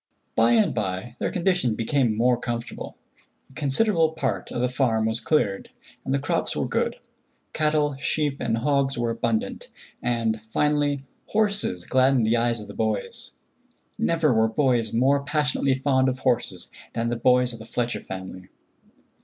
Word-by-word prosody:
By 115 +1 +4
and 110 -2 +3
by 100 +2 -3
their - - 0
condition 180 - +1
became 115 -1 +1
more 125 +2 +4
comfortable. 120 -1 -5 0.5
A - - -18
considerable 160 +3 +2
part 140 -4 -2
of - - -3
the 125 - +2
farm 120 -4 +1
was 110 +1 -1
cleared, 105 -12 0 0.3
and - - -4
the 140 - +3
crops 140 +1 -1
were - - -1
good. - - 0 0.6
Cattle, 150 -2 +1
sheep 145 -1 -1
and 115 -2 0
hogs 135 +1 +1
were 120 -1 0
abundant, 115 -1 -2 0.3
and, 115 -3 0
finally, 145 +1 +1 0.2
horses 205 - +1
gladdened 130 -2 +3
the 110 +2 +3
eyes 115 0 +1
of 105 - -9
the - - -9
boys. 110 -3 -2 0.6
Never 160 -5 +2
were 110 0 +3
boys 120 -3 +1
more 135 +4 +3
passionately 145 -2 +1
fond 130 -1 +2
of 130 - -3
horses 120 -8 0 0.2
than 115 0 -1
the 120 - -1
boys 125 +1 +3
of 115 - -8
the 110 - -10
Fletcher 120 0 -2
family. 95 -1 -8
125 Hz, 160 wpm, -25 LUFS, 115-140 Hz, 0.6 s, By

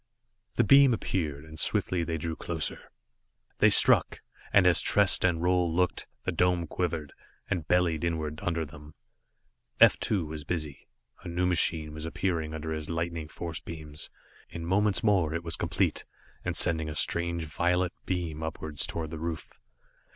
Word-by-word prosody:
The - - +4
beams 135 -3 +6
appeared, 75 -9 -3
and 80 0 -11
swiftly 90 -2 +1
they 80 -1 -2
drew 80 +1 -3
closer. 80 0 -4 0.7
They - - +6
struck, - - +4 0.3
and 100 -2 +5
as 90 -1 +5
Trest 100 -2 +3
and 85 -3 +1
Roal 90 -1 +2
looked, 90 +1 0 0.2
the - - 0
dome 90 -1 +1
quivered, 80 -3 -3 0.4
and 85 -6 -1
bellied 85 -3 +2
inward 80 -2 -2
under 85 -1 -1
them. 75 -1 -13 0.8
F - - +7
2 95 -6 0
was 75 -1 -6
busy. 75 -2 -4 0.3
A - - -9
new 85 +1 -1
machine 80 -3 +1
was 80 +1 -7
appearing 80 -3 -2
under 80 0 -4
his 75 -1 -5
lightning 85 -1 -3
force 80 0 -6
beams. 75 -3 -8 0.4
In 85 0 -6
moments 95 +1 +2
more 90 -7 +2
it 85 - -3
was 85 -1 0
complete, - - -1 0.4
and - - -3
sending 80 -3 +1
a 75 - -6
strange 85 +1 +1
violet 90 +3 0
beam 85 -4 -2
upwards 80 -2 -4
toward 80 -2 -5
the 80 - -6
roof. 80 -1 -5
85 Hz, 160 wpm, -28 LUFS, 80-90 Hz, 0.8 s, F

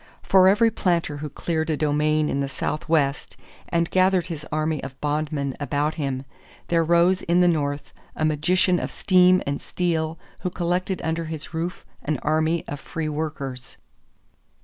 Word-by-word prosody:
For 185 -1 +5
every 220 +4 +5
planter 170 -7 0
who 150 +1 -5
cleared 160 +2 -2
a 155 - +1
domain 150 +1 +1
in 140 - -1
the 140 -1 -1
Southwest 150 -1 -1 0.3
and 170 -1 +1
gathered 185 -1 +3
his 160 -4 -6
army 155 0 -1
of 135 -1 -8
bondmen 145 -2 -1
about 145 +1 0
him, 135 -3 -3 0.4
there 165 -1 +3
rose 170 +3 +3
in 175 +1 +2
the 180 - +5
North 145 -4 -1 0.2
a 155 - 0
magician 175 +4 +2
of - - -4
steam 185 -1 +4
and 140 0 -2
steel 165 -2 -1 0.2
who 180 - -2
collected 180 +2 -2
under 165 +1 -1
his 160 0 -7
roof 170 +2 -4 0.2
an 155 0 -1
army 160 +2 +1
of 145 - -5
free 155 +2 -4
workers. 145 -4 -5
160 Hz, 160 wpm, -24 LUFS, 150-175 Hz, 0.4 s, For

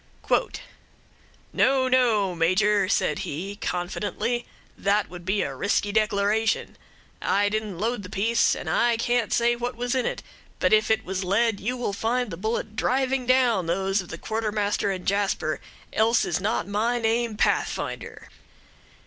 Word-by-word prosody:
"'No, 265 -1 +3
no, 230 -7 +3
Major,' 185 +4 +2
said 150 - +1
he, 190 +8 -4
confidently, 205 +6 -2 0.3
'that 200 0 0
would 175 -1 -9
be 195 +2 +1
a - - -4
risky 205 0 0
declaration. 215 +1 +1 0.5
I 205 +1 +2
didn't 215 -3 -3
load 225 +3 -1
the 185 - -9
piece, 220 +4 +2
and - - -7 0.3
can't 240 0 +1
say 240 0 +3
what 245 +1 -4
was 245 +1 -2
in 260 -1 +1
it; - - -4 0.3
but - - +2
if 215 0 +4
it 220 0 +1
was 190 +1 -3
lead, 205 +3 +1
you 245 +6 -2
will 240 -5 -2
find 235 +2 -1
the - - -4
bullet 220 +3 -3
driving 260 +1 0
down 245 -8 +3
those 195 +3 0
of 180 - -12
the 165 - -6
Quartermaster 210 -2 -1
and 185 -2 -4
Jasper, 200 0 0 0.3
else 225 +2 +3
is - - -1
not 210 +1 -1
my 220 +4 0
name 230 -1 0
Pathfinder.' - - -1
215 Hz, 150 wpm, -25 LUFS, 195-235 Hz, 0.5 s, if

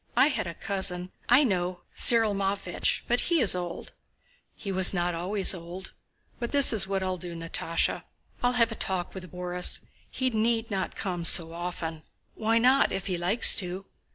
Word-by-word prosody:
I - - +5
had 260 - -3
a 170 - -7
cousin..." 185 -2 -3 0.2
"I 250 +5 +6
know! 180 -6 -2
Cyril 225 -3 +6
Matvéich... 195 -2 -1
but 240 +1 +1
he 340 -2 0
is 220 -8 +5
old." 175 -1 -6 0.6
"He 200 - -7
was 190 0 +6
not 175 0 -1
always 190 +4 +2
old. 180 +2 -8 0.5
But 235 -1 -4
this 280 -4 +5
is 200 -3 +2
what 195 -1 -2
I'll 185 -1 -3
do, 175 -1 -7
Natásha, 165 0 -2 0.4
I'll 245 0 +1
have 230 -2 +2
a - - -3
talk 185 -5 -3
with 185 -3 -10
Borís. 180 0 -1 0.3
He 260 -1 -2
need 225 0 0
not 190 -1 -3
come 180 -3 -4
so 165 0 +3
often...." 170 -2 -6 0.3
"Why 225 +1 0
not, 255 +4 +3
if 190 - -4
he 185 - -2
likes 190 +7 +5
to?" 185 -1 -3
190 Hz, 180 wpm, -26 LUFS, 175-225 Hz, 0.6 s, I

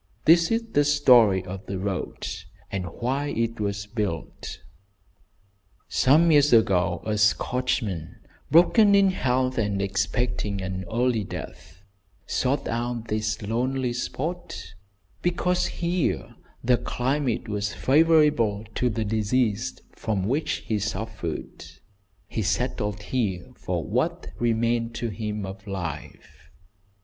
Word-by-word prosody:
This 165 +1 +6
is 230 +1 +1
the 145 - +4
story 125 -10 +5
of 95 +1 -7
the 95 - -3
road, 95 -1 -3 0.4
and 95 -2 -2
why 130 - -2
it 115 -3 -2
was 100 0 -2
built: 105 -7 -4 1.3
Some 160 +6 +4
years 150 -1 +5
ago 90 -6 +3
a 105 -1 -1
Scotchman, 110 - 0 0.3
broken 200 +5 +6
in 195 -1 +5
health 130 -6 0
and 100 -2 0
expecting 100 +1 -1
an 95 0 -4
early 120 -1 +1
death, 90 -1 -9 0.4
sought 135 +2 0
out 120 0 -3
this 110 0 -1
lonely 125 +3 -1
spot, 125 - -4 0.5
because 180 +1 +1
here 175 -1 -1 0.3
the 125 0 +4
climate 130 -1 -1
was 105 -1 -2
favourable 145 -8 +3
to 125 - +1
the 110 -1 -2
disease 110 +2 0
from 105 -4 -2
which 145 +9 -1
he 110 -2 0
suffered. 105 -4 -4 0.6
He - - -3
settled 105 0 -1
here 100 -8 -2
for - - -3
what - - -1
remained 115 0 +1
to 120 - -2
him 105 -1 -4
of 95 +2 -9
life. 90 -6 -7
115 Hz, 120 wpm, -25 LUFS, 100-130 Hz, 1.3 s, This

